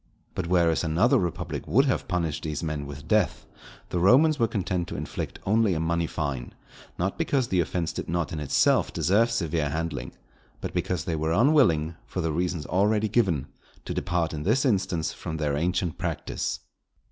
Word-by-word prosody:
But 90 - -3
whereas 85 -2 +3
another 100 - +3
republic 85 -5 -3
would 135 +4 +4
have 130 - 0
punished 85 -5 -1
these 75 0 -3
men 75 -3 -3
with 70 +2 -9
death, 105 -2 +1 0.4
the 90 - -1
Romans 140 - +5
were 115 - +3
content 90 -4 -2
to - - -6
inflict - - -5
only 110 -2 +3
a - - -1
money 85 +1 0
fine: 70 -7 -4 0.4
not 95 +3 -2
because 130 -4 +1
the 95 - +2
offence 85 -1 -1
did - - -5
not 85 -3 -1
in 80 - -3
itself 75 - +2
deserve 110 +6 +2
severe 85 -9 -1
handling, 80 +3 -3 0.5
but - - -5
because 90 -3 -1
they 85 - -1
were 80 +1 0
unwilling, 90 - +3
for - - -5
the 80 -2 0
reasons 85 0 -1
already 105 +3 +2
given, 90 - +1 0.4
to - - -3
depart 85 -3 -1
in 75 - -4
this 115 - +2
instance 95 -8 0
from 80 - -5
their 75 -2 0
ancient 90 +2 -1
practice. 85 -3 -3
85 Hz, 180 wpm, -26 LUFS, 80-100 Hz, 0.5 s, Romans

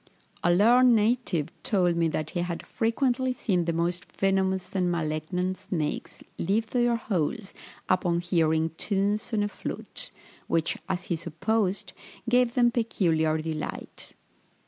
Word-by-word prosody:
A 175 - +4
learned 240 +6 +6
native 210 - +1
told 180 -4 +2
me 170 -1 +2
that 155 -1 -3
he 175 - -2
had 175 -1 -3
frequently 250 +3 0
seen 185 -8 0
the 170 - +1
most 170 +2 -2
venomous 190 -1 +1
and 180 -2 +1
malignant 170 +3 -2
snakes 155 -5 -3 0.2
leave 205 +6 +1
their 240 -1 +3
holes 195 -2 -2 0.3
upon 175 -2 +2
hearing 160 -2 +2
tunes 205 +2 0
on 215 -2 +1
a - - +1
flute, - - -6 0.4
which, 165 -1 +1
as 185 -1 -1
he 170 - -1
supposed, 185 +4 -1 0.3
gave 245 +1 +3
them 240 -2 +4
peculiar 165 -9 +1
delight. 155 -1 -5
185 Hz, 135 wpm, -27 LUFS, 170-220 Hz, 0.4 s, learned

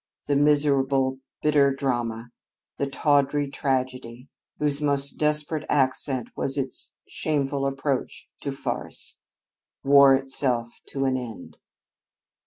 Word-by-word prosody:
The 145 - +1
miserable, 140 -2 +2 0.2
bitter 145 -2 +4
drama 120 -4 -2 0.5
the 140 - -1
tawdry 145 0 +1
tragedy, 130 -2 -3 0.3
whose 145 -1 +2
most 140 -1 0
desperate 150 0 +1
accent 130 -2 +1
was 135 +1 -1
its 135 -2 -3 0.2
shameful 140 -2 -1
approach 135 -1 -3
to 140 - -4
farce 135 - -4 0.6
wore 140 -1 +7
itself 130 -3 0 0.2
to 135 -1 -2
an 130 -1 +1
end. 120 -3 -8
135 Hz, 105 wpm, -25 LUFS, 130-145 Hz, 0.6 s, wore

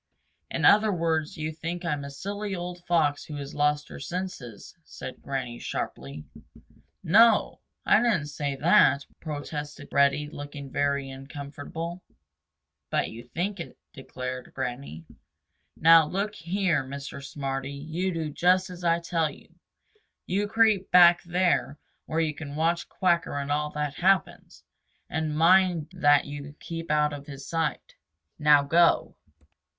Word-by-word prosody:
"In - - -1
other 215 +1 +6
words 165 -3 -1
you 155 0 -3
think 170 +3 -5
I'm 150 -4 -1
a 140 - -6
silly 200 +7 -5
old 175 0 -6
Fox 155 -4 +2
who 150 - -8
has 140 -1 -6
lost 150 0 +1
her - - -9
senses," 140 - -6
said 130 -4 -9
Granny 125 -3 -4
sharply. 70 +4 -5 0.8
"No 225 +8 +7
o. 215 - -1 0.3
I - - +5
didn't 215 -11 +1
say 145 -1 -3
that," 140 -2 +4
protested 145 -1 -6
Reddy, 140 +1 +3
looking 145 -2 -8
very 140 -1 0
uncomfortable. 145 +5 -7 0.9
"But - - 0
you 115 +2 -9
think 180 +9 -3
it," 165 - -8 0.2
declared 130 -1 -7
Granny. 120 - -5 0.7
"Now 165 -1 +7
look 200 +5 -2
here, 175 -4 0
Mr. 140 +1 -7
Smarty, 135 -1 -4
you 160 +6 -3
do 160 -3 -3
just 185 +4 +2
as 180 0 -10
I 170 0 +2
tell 165 -2 0
you. - - -15 0.7
You 200 +3 0
creep 220 -3 +3
back 175 -1 +7
there 175 -6 0 0.3
where 160 +1 0
you 155 -2 0
can 145 -1 -8
watch 165 +2 0
Quacker 170 -5 0
and 140 0 -3
all 150 +1 0
that 150 -1 -2
happens, 185 +1 0 0.5
and 155 -1 -2
mind 175 -1 +4
that 145 -5 +4
you 145 0 -8
keep 165 0 -7
out 150 -1 +2
of 145 -1 -8
his 140 -2 -9
sight. 165 -2 -2 0.5
Now 150 -1 +6
go." 165 +4 +3
155 Hz, 145 wpm, -27 LUFS, 140-175 Hz, 0.9 s, No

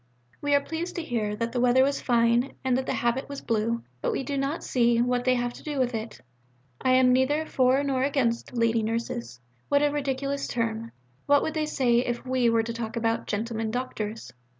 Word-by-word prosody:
We 290 0 +2
are 285 - +4
pleased 325 +4 -5
to 340 - -3
hear 215 -7 -2
that 230 +2 -2
the 245 - -1
weather 250 +1 +5
was 280 +1 0
fine 235 +1 +2
and 260 -1 +2
that 260 +1 -1
the - - 0
habit 240 +4 -1
was 280 -1 -5
blue, 230 +1 -1 0.2
but - - 0
we - - -2
do 285 +1 -3
not 275 +4 -2
see 235 -2 +2
what 245 0 +1
they 255 0 +4
have 245 0 -1
to - - -12
do 295 -2 -4
with 255 -2 +1
it. 225 0 -5 0.6
I 255 - +3
am 255 -1 +5
neither 290 +5 +2
for 260 -1 +2
nor 270 -2 0
against 260 -4 0
'Lady 230 -1 +2
Nurses' 215 - -3 0.3
(what 285 0 +3
a 295 - +3
ridiculous 275 -1 -2
term! 230 -1 -2 0.4
what 285 0 +5
would 315 - -2
they 310 -1 -1
say 245 -5 +2
if 240 0 -2
we 255 -2 +2
were 230 -1 +3
to 230 +1 -4
talk 230 0 -5
about 225 0 -1
'Gentlemen 225 +1 -2
Doctors'?). 225 -2 -4
245 Hz, 215 wpm, -26 LUFS, 230-275 Hz, 0.6 s, weather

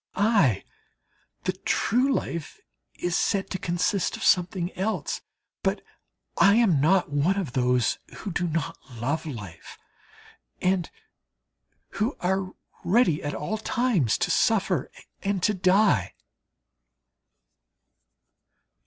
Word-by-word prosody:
Aye! 195 - +3 0.8
The - - +1
true 255 +5 +1
life 170 - -3 0.4
is 175 0 -2
said 195 0 0
to 185 - -3
consist 175 +2 0
of - - -7
something 180 0 +2
else: 190 -5 -2 0.4
but - - -1 0.6
I 200 +1 +6
am 200 - +4
not 175 +1 +3
one 150 +7 +1
of 170 -11 -3
those 125 -2 +1 0.2
who 200 - -6
do 175 +1 -1
not 160 -2 -2 0.2
love 145 +7 -2
life, 100 - -9 0.8
and 180 -2 +1 1.0
who 225 +7 -2
are 190 +1 -1 0.3
ready 180 -6 +3
at 145 - -3
all 215 +8 -3
times 220 - +1
to - - -3
suffer - - +2 0.3
and 195 -2 -1
to 210 - +3
die. 190 - +3
180 Hz, 110 wpm, -26 LUFS, 150-200 Hz, 1.0 s, I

